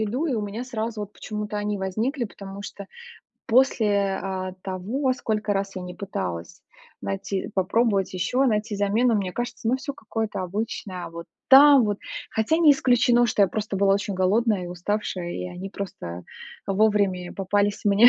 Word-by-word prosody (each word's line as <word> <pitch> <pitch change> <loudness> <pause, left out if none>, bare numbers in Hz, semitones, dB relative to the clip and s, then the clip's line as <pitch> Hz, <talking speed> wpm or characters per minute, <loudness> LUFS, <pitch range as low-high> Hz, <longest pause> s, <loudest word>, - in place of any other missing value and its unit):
еду 240 +9 -1
и 280 - 0
у 220 - 0
меня 210 +4 -4
сразу 225 -3 -4
вот 205 0 -6
почему-то 210 -1 -5
они 205 0 -1
возникли, 225 +8 -1
потому 200 -1 -8
что 200 -1 -8 0.6
после, 210 -6 +3
а, 185 -1 -3
того, 215 +9 -1
сколько 215 -4 -1
раз 195 0 -2
я 185 - -4
не 180 0 -7
пыталась 90 - -5 0.4
найти 100 - -3
попробовать 200 +1 +2
еще, 250 +9 +1
найти 215 -2 0
замену, 215 +4 +2
мне 195 -3 -1
кажется, 235 -1 -3
оно 255 - +3
всё 280 +2 -5
какое-то 220 -4 -4
обычное, 185 -1 -4
а - - -7
вот 170 0 -8 0.2
там 275 -1 +9
вот. 205 -1 -1 0.3
Хотя 220 +9 +1
не 315 -4 +7
исключено, 245 -2 +4
что 210 -3 +2
я 195 - +5
просто 210 -2 -3
была 195 0 +4
очень 200 0 -2
голодная 200 +1 +2
и - - -6
уставшая, 180 0 -3
и 180 - -4
они 180 +2 -7
просто, 90 - -6 0.4
а, 195 - 0
вовремя 200 -3 +2
попались 200 +1 0
мне. 205 +4 +7
205 Hz, 175 wpm, -25 LUFS, 190-230 Hz, 0.6 s, там